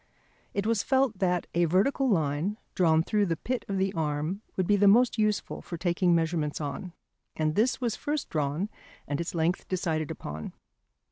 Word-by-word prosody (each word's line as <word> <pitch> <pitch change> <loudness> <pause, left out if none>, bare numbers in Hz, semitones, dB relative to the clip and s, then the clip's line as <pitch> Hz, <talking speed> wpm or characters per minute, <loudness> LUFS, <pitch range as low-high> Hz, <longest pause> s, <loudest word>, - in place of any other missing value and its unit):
It 200 - 0
was 225 -2 +2
felt 265 -7 +1
that 180 -2 +1
a 175 0 +3
vertical 220 - +2
line 165 +2 0 0.2
drawn 160 -3 +3
through 205 +2 +1
the 165 -2 -1
pit 250 +7 -3
of 195 - -2
the 190 0 0
arm 155 +4 -2 0.2
would 185 - +2
be 205 - +4
the 205 0 +4
most 235 +3 +5
useful 215 -1 0
for 170 - -6
taking 175 0 +2
measurements 160 -2 0
on, 165 +5 -5 0.4
and 155 -1 0
this 225 +8 +2
was 240 -4 -1
first 295 -1 -2
drawn 150 +5 -1 0.4
and 145 +2 -1
its 170 - -4
length 170 +3 0
decided 165 -4 -1
upon. 80 - -6
180 Hz, 180 wpm, -28 LUFS, 160-210 Hz, 0.4 s, most